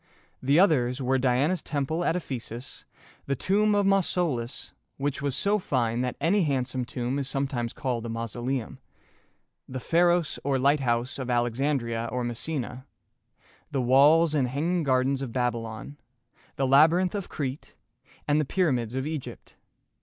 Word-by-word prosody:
The 140 Hz, +5 st, +3 dB
others 135 Hz, -9 st, +3 dB
were 130 Hz, 0 st, +1 dB
Diana's 135 Hz, +7 st, +2 dB
Temple 155 Hz, +3 st, -2 dB
at 170 Hz, -, +1 dB
Ephesus, 125 Hz, -6 st, -6 dB, 0.4 s
the 140 Hz, -, 0 dB
Tomb 210 Hz, -, +2 dB
of 205 Hz, -1 st, +2 dB
Mau 195 Hz, 0 st, +5 dB
so´lus 150 Hz, -10 st, -2 dB, 0.3 s
(which 140 Hz, 0 st, -2 dB
was 140 Hz, -2 st, -1 dB
so 205 Hz, +1 st, +2 dB
fine 120 Hz, -, 0 dB
that 125 Hz, -1 st, -2 dB
any 180 Hz, +7 st, +2 dB
handsome 130 Hz, -3 st, -1 dB
tomb 125 Hz, +2 st, -3 dB
is 135 Hz, 0 st, -3 dB
sometimes 135 Hz, -4 st, -2 dB
called 120 Hz, -3 st, -3 dB
a -, -, -5 dB
mausoleum), 120 Hz, +3 st, -4 dB, 0.9 s
the 130 Hz, -, -5 dB
Pha´ros 170 Hz, +3 st, +2 dB
or 140 Hz, -1 st, +1 dB
Lighthouse 130 Hz, -2 st, +1 dB
of 130 Hz, -1 st, -4 dB
Alexandria 120 Hz, -1 st, 0 dB
or 125 Hz, 0 st, -2 dB
Messina, 125 Hz, +1 st, -4 dB, 0.8 s
the 140 Hz, -, -2 dB
Walls 145 Hz, +6 st, +5 dB
and 140 Hz, -4 st, +2 dB
Hanging 165 Hz, +7 st, 0 dB
Gardens 135 Hz, -1 st, +1 dB
of 130 Hz, -4 st, -4 dB
Babylon, 120 Hz, +1 st, -3 dB, 0.6 s
the 135 Hz, -, 0 dB
Labyrinth 160 Hz, +7 st, +5 dB
of 200 Hz, -3 st, -4 dB
Crete, 135 Hz, -1 st, -5 dB, 0.5 s
and 150 Hz, +1 st, +3 dB
the -, -, -1 dB
Pyramids 130 Hz, -, 0 dB
of 130 Hz, +1 st, -2 dB
Egypt. 155 Hz, -3 st, -6 dB
135 Hz, 145 wpm, -27 LUFS, 125-155 Hz, 0.9 s, Mau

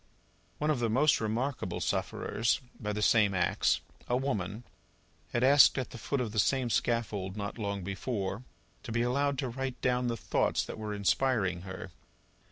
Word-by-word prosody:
One 150 Hz, +1 st, +1 dB
of 145 Hz, -, 0 dB
the 115 Hz, -1 st, +1 dB
most 140 Hz, +5 st, +3 dB
remarkable 120 Hz, +5 st, -2 dB
sufferers 115 Hz, +1 st, 0 dB, 0.2 s
by 105 Hz, -2 st, -3 dB
the 105 Hz, 0 st, -2 dB
same 105 Hz, -4 st, +4 dB
axe 90 Hz, -1 st, +2 dB, 0.3 s
a 125 Hz, -, +2 dB
woman 110 Hz, -5 st, -2 dB, 0.7 s
had 120 Hz, -, 0 dB
asked 140 Hz, +2 st, +7 dB
at 130 Hz, -3 st, -3 dB
the 120 Hz, -, -8 dB
foot 140 Hz, +5 st, -2 dB
of 120 Hz, -4 st, -2 dB
the 110 Hz, -, -1 dB
same 125 Hz, +3 st, +2 dB
scaffold, 105 Hz, -6 st, -1 dB
not 100 Hz, +3 st, -4 dB
long 100 Hz, -2 st, -2 dB
before, 100 Hz, +2 st, -3 dB, 0.4 s
to -, -, -7 dB
be 120 Hz, +1 st, +1 dB
allowed 140 Hz, +3 st, +1 dB
to 135 Hz, -1 st, -1 dB
write 130 Hz, +1 st, -4 dB
down 125 Hz, -1 st, +1 dB
the 115 Hz, -1 st, -1 dB
thoughts -, -, 0 dB
that -, -, -7 dB
were 105 Hz, -1 st, -4 dB
inspiring 100 Hz, -2 st, +1 dB
her. 95 Hz, 0 st, -8 dB
115 Hz, 175 wpm, -30 LUFS, 100-130 Hz, 0.7 s, asked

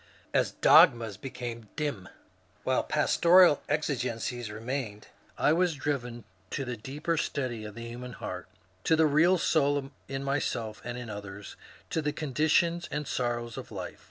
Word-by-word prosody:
As -, -, +2 dB
dogmas 115 Hz, -4 st, +6 dB
became 120 Hz, -2 st, -7 dB
dim, 145 Hz, -12 st, -3 dB, 0.5 s
while 130 Hz, -, +2 dB
pastoral 170 Hz, +2 st, +5 dB
exigencies 125 Hz, -5 st, -2 dB
remained, 110 Hz, -1 st, -5 dB, 0.3 s
I 150 Hz, -, +4 dB
was 175 Hz, -1 st, +2 dB
driven 125 Hz, -4 st, -3 dB, 0.3 s
to 135 Hz, -, -3 dB
the 125 Hz, -1 st, -3 dB
deeper 150 Hz, +9 st, -3 dB
study 125 Hz, -7 st, -2 dB
of 105 Hz, -1 st, -8 dB
the 115 Hz, 0 st, -7 dB
human 125 Hz, +1 st, -7 dB
heart, -, -, -6 dB, 0.4 s
to 160 Hz, -, +5 dB
the 160 Hz, 0 st, +4 dB
real 160 Hz, +5 st, +4 dB
soul 145 Hz, -4 st, +1 dB, 0.2 s
in 135 Hz, 0 st, -4 dB
myself 120 Hz, -6 st, -2 dB
and 120 Hz, 0 st, -5 dB
in 120 Hz, -3 st, -6 dB
others, 100 Hz, 0 st, -8 dB, 0.4 s
to 160 Hz, -, 0 dB
the 150 Hz, -1 st, -1 dB
conditions 160 Hz, +4 st, +1 dB
and 145 Hz, 0 st, -3 dB
sor 120 Hz, -1 st, 0 dB
rows 120 Hz, 0 st, -7 dB
of -, -, -8 dB
life. -, -, -6 dB
130 Hz, 155 wpm, -29 LUFS, 115-150 Hz, 0.5 s, dogmas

